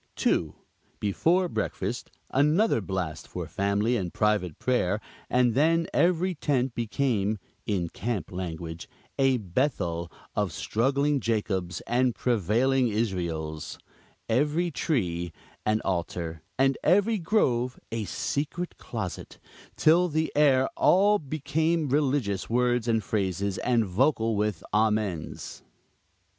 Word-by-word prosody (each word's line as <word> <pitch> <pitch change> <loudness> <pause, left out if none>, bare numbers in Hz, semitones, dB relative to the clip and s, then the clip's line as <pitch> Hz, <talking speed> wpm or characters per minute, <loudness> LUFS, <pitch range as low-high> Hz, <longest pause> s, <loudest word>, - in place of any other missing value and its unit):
2. - - +1 0.4
Before 170 - +2
breakfast, - - -3 0.2
another 150 - +3
blast 90 -5 -4
for - - -5
family 100 +4 0
and 90 -7 -2
private 105 -7 0
prayer; 105 -6 +1 0.3
and 125 -2 +3
then 165 +5 +3
every 180 +1 +2
tent 135 -5 0
became, 110 -3 0 0.3
in 95 -5 0
camp 100 -1 -4
language, 85 -2 -5 0.3
"a 135 -1 +4
bethel 90 - -1 0.2
of 105 -4 0
struggling 135 - +1
Jacobs 100 -6 -1
and 125 -1 +1
prevailing 125 +4 +2
Israels," 85 -8 -2 0.5
every 150 +8 +1
tree 85 - -1 0.4
"an 110 0 +2
altar;" 85 -3 -3 0.2
and 135 +1 +2
every 205 +5 +3
grove 130 - +1
"a 115 -2 -2
secret 155 - -3
closet;" - - -6 0.4
till 170 +3 +4
the 160 -1 -1
air 135 -3 +4
all 205 +3 +4
became 155 +2 0
religious 135 -8 0
words 120 0 +1
and 115 -2 +2
phrases, 95 -2 -1
and 120 -3 +2
vocal 115 +3 +1
with 105 -4 -1
"Amens." 105 -6 -1
115 Hz, 110 wpm, -27 LUFS, 95-145 Hz, 0.5 s, a